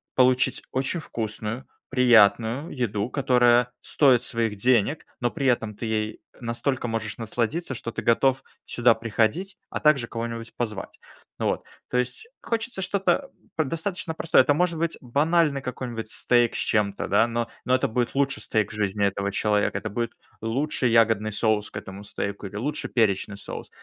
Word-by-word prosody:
получить 130 0 +3
очень 135 +6 -1
вкусную, 115 -2 -5 0.2
приятную 120 +2 +4
еду, 110 -4 -2
которая 125 -3 +4
стоит 130 -5 +4
своих 115 -3 -1
денег, 125 +6 +2
но 120 - +1
при 140 0 -4
этом 115 -4 +1
ты 115 - -5
ей 110 -1 -2 0.2
настолько 120 +2 -2
можешь 110 -2 -3
насладиться, 120 +7 -2
что 115 - -5
ты - - -4
готов 130 +3 +2 0.2
сюда 120 -1 +3
приходить, 115 - 0
а - - -3
также 145 -6 +3
кого-нибудь 115 0 -5
позвать. 110 -5 -4 0.4
Ну - - -2
вот, - - -1 0.3
то 125 - 0
есть 125 - -2
хочется 230 -3 -2
что-то 200 +8 +1 0.3
п 160 - +2
достаточно 165 +4 -3
простое. 165 -3 +4
Это 145 - +3
может 170 0 +1
быть 165 0 -1
банальный 145 +3 +2
какой-нибудь 120 -3 -5
стейк 120 -1 +2
с - - -1
чем-то, 105 -3 0
да, 105 +3 +4
но 115 0 -2 0.2
но 130 - +3
это 130 - +1
будет 120 +3 -1
лучший 140 0 +1
стейк 110 -3 0
в - - -7
жизни 100 -1 0
этого 100 0 -1
человека. 105 +1 +1
Это 110 - -4
будет 115 +3 -3 0.3
лучший 125 +3 0
ягодный 110 -2 +3
соус 105 0 +1
к - - -8
этому 95 +1 -8
стейку 100 -1 -4
или 95 - -11
лучший 130 +8 -2
перечный 100 -3 +1
соус. 100 - -8
120 Hz, 165 wpm, -25 LUFS, 110-135 Hz, 0.4 s, приятную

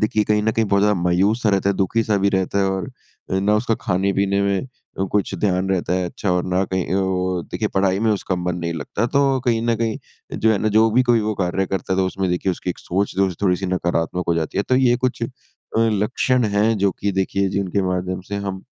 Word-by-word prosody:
देखिए 110 0 +2
कहीं 105 0 +1
ना 110 - +2
कहीं 115 - +1
बहुत 100 0 +2
ज़्यादा 105 0 +3
मायूस-सा 100 +6 +2
रहता 100 0 +1
है, 100 - 0
दुखी-सा 105 +2 +1
भी 100 +1 +2
रहता 95 0 0
है 100 - +3
और 95 -1 -3 0.5
ना 105 +2 +2
उसका 115 +1 0
खाने-पीने 100 +1 +1
में 100 -1 +1 0.4
अ 95 - +1
कुछ 105 -1 0
ध्यान 95 -2 +1
रहता 90 -2 0
है 90 0 0
अच्छा 95 +2 -3
और 90 0 0
ना 90 +1 +1
कहीं 95 -1 -2
अ, - - +2
वो 95 -1 -1
देखिए - - -1
पढ़ाई 95 0 +2
में 110 0 +2
उसका 95 -2 -2
मन 90 0 -2
नहीं 85 -1 -2
लगता। 95 +9 -2
तो 135 -1 +2
कहीं 115 -2 +1
ना 115 0 +1
कहीं 115 -1 -1 0.4
जो 110 0 +3
है 100 - +1
ना 110 - +1
जो 110 0 +5
भी 125 +4 +4
कोई 120 -2 +5
वो 110 0 -1
कार्य 95 +1 0
करता 95 0 -3
है 95 - 0
तो 95 - +2
उसमें 95 0 -2
देखिए 90 +1 0
उसकी 90 - -4
एक - - -7
सोच-जोज़ 95 0 -1
थोड़ी-सी 95 0 +1
नकारात्मक 90 -1 -1
हो 85 - +3
जाती 80 +2 -2
है। 100 - +3
तो 130 - +3
ये 125 -2 +4
कुछ 125 -1 -2
अ, 115 - 0 0.5
लक्षण 115 +3 +1
हैं 105 +2 +2
जो 100 0 +2
कि 100 - 0
देखिए 95 +1 0
जिनके 100 0 -1
माध्यम 90 0 -2
से 100 - -3
हम 100 -1 -4
100 Hz, 235 wpm, -21 LUFS, 95-110 Hz, 0.5 s, जो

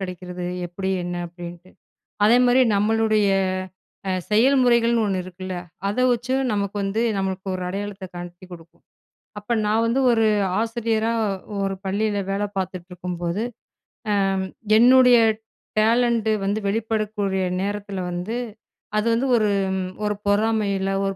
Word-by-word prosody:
கிடைக்கிறது. 180 -1 -6 0.2
எப்படி? 190 +2 -4
என்ன? 175 0 -4
அப்படின்ட்டு. 175 +1 -10 0.6
அதேமாரி 245 +2 +5
நம்மளுடைய 215 0 +2 0.8
அ - - +1 0.2
செயல்முறைகள்ன்னு 235 -1 +4
ஒண்ணு 190 -2 -1
இருக்குல, 185 0 -7 0.3
அதை 255 +5 0
வச்சும் 255 +3 -1
நமக்கு 200 0 -2
வந்து 195 +3 -1 0.2
நம்மளுக்கு 190 0 -3
ஒரு 185 - -6
அடையாளத்த 195 0 -5
காட்டிக் 175 +1 -9
கொடுக்கும். 170 0 -14 0.6
அப்ப 210 +3 -4
நான் 220 +2 +2
வந்து 235 +4 +1
ஒரு 225 -1 +3 0.3
ஆசிரியரா 225 -1 0 0.5
ஒரு 195 0 -1
பள்ளியில 205 +2 0
வேலை 205 +1 0
பார்த்துட்ருக்கும்போது, 180 0 -4 0.7
அ - - +3 0.7
என்னுடைய 250 0 +7 0.6
டேலண்டு 230 0 +3
வந்து 205 +2 0
வெளிப்படக்கூடிய 210 -2 -1 0.2
நேரத்தில 200 0 -3
வந்து, 180 +7 -3 0.6
அது 215 - +1
வந்து 255 +4 +1
ஒரு 210 -2 +2 0.5
ஒரு 210 - 0
பொறாமையில்ல, 205 -2 +1 0.2
ஒரு 195 - -2
205 Hz, 115 wpm, -23 LUFS, 185-225 Hz, 0.8 s, என்னுடைய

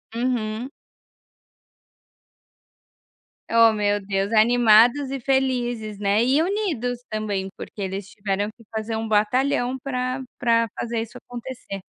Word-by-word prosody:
Uhum. 235 -1 -1 2.8
Ó 230 -1 +5
meu 205 -1 +1
Deus 195 +1 -1
animados 240 +4 +5
e 275 - -3
felizes, 245 -5 0
né, 205 +2 +2
e 270 +5 +3
unidos 325 - -1
também, 205 -3 -2
porque 205 - -8
eles 195 +1 -4
tiveram 205 -2 -2
que 230 - -18
fazer 220 0 -3
um 225 0 -3
batalhão 245 +4 +1
pra 255 0 -2 0.2
pra 230 -1 +2
fazer 230 -1 -2
isso 230 +2 -8
acontecer. 240 -4 -8
230 Hz, 115 wpm, -23 LUFS, 215-250 Hz, 2.8 s, Ó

